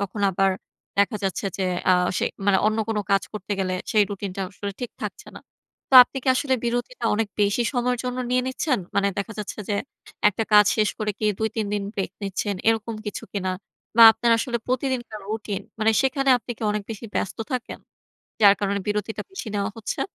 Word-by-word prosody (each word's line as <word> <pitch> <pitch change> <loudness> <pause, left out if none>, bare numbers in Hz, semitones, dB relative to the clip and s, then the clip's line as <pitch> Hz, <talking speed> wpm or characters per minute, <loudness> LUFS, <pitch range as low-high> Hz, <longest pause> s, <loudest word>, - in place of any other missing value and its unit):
তখন 200 +1 -4
আবার 195 +1 +2 0.5
দেখা 205 +2 +3
যাচ্ছে 190 - -2
যে 190 - 0 0.3
আ - - +7 0.3
সে - - +1 0.2
মানে 200 -1 +5
অন্য 215 +1 +1
কোন 220 -2 0
কাজ 195 0 +4
করতে 210 -1 -5
গেলে 185 -1 0 0.2
সেই 215 - +5
রুটিনটাও 195 -1 -4
আসলে 200 +1 -5
ঠিক 245 - -4
থাকছে - - -7
না। - - -9 0.5
তো - - +2
আপনি 260 - -8
কি - - -2
আসলে 260 0 +1
বিরতিটা 240 0 -2
অনেক 220 0 0
বেশি 205 +4 +2
সময়ের 250 -1 0
জন্য 250 0 -3
নিয়ে 250 0 +2
নিচ্ছেন? 260 0 0 0.2
মানে 200 0 +3
দেখা 200 +3 -3
যাচ্ছে 210 0 -5
যে, 205 - 0 0.5
১ 210 +2 -2
কাজ 210 0 +8
শেষ 215 -1 +3
করে 215 -1 -1
কি 215 - -3
২-৩ 220 -1 -1
দিন 205 - -1
ব্রেক 195 - -2
নিচ্ছেন, 200 +1 -2
এরকম 225 0 +1
কিছু 210 - -4
কিনা? 190 -2 -2 0.5
বা, 230 - +9
আপনার 235 +1 0
আসলে 240 +1 -1
প্রতিদিনকার 250 -4 -2
রুটিন 215 -2 -3 0.2
মানে, 220 +1 +3
সেখানে 270 0 +1
আপনি 245 - -10
কি - - -8
অনেক 210 0 -2
বেশি 225 +1 -6
ব্যস্ত 195 - -2
থাকেন? 250 -2 -4 0.6
যার 200 -2 +8
কারণে 200 0 0
বিরতিটা 210 +1 -2
বেশি 385 - -6
নেওয়া 200 +1 -1
হচ্ছে? 225 - -4
215 Hz, 195 wpm, -24 LUFS, 200-240 Hz, 0.6 s, বা